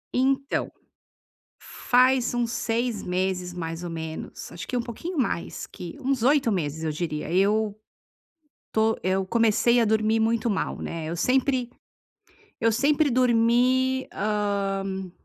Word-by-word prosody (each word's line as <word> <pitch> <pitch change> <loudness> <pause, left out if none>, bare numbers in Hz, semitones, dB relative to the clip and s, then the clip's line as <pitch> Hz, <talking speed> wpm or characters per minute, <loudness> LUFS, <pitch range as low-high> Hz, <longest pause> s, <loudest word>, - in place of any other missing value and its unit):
Então, 270 +2 +1 0.9
faz 255 0 +2
uns 240 -1 0
6 230 -2 -1
meses 180 0 -2
mais 165 0 -5
ou 175 - -4
menos, 160 -1 -6
acho 165 -1 -7
que - - -3
um - - +1
pouquinho 295 +9 -6
mais 230 -9 -2
que 180 +9 -9
uns 270 -3 -1
8 270 -3 +3
meses, 160 -2 -2
eu 155 - 0
diria, 150 -1 -4
eu 205 +2 +2 0.9
estou 220 0 +1
eu 190 +1 +1
comecei 230 +3 +3
a 230 - +3
dormir 220 +1 +2
muito 230 +1 +1
mal, 200 - -1
né, 165 -1 -5
eu 170 - -3
sempre 255 - +1 0.9
eu 230 0 +3
sempre 285 +5 +2
dormi, 255 +2 +3
hã, 195 -2 -2
225 Hz, 135 wpm, -25 LUFS, 185-250 Hz, 0.9 s, 8